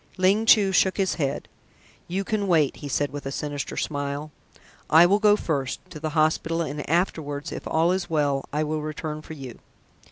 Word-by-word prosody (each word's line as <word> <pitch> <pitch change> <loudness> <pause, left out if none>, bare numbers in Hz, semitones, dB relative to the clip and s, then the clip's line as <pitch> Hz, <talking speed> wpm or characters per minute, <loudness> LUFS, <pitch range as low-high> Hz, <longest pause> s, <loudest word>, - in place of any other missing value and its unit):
Ling 195 +4 +3
Chu 200 -4 +6
shook 190 0 +3
his 195 -2 +1
head. 135 -1 -2 0.6
"You 190 +3 -2
can 205 0 -1
wait," 160 -6 +2
he 145 - -7
said 145 +1 -1
with 145 -1 -6
a - - -3
sinister 145 0 -4
smile. 145 +1 -3 0.6
"I 160 +2 +8
will 200 +4 +3
go 210 -1 +5
first 140 -9 -2
to 155 - -8
the 155 +1 -3
hospital 160 +1 +2
and 145 -1 -5
afterwards, 155 -3 -1
if - - -6
all 165 +2 +2
is 185 0 -2
well, 145 -4 +1
I 150 +2 0
will 155 0 -2
return 155 0 -5
for 160 - -9
you." 130 -5 -9
155 Hz, 190 wpm, -25 LUFS, 145-180 Hz, 0.6 s, I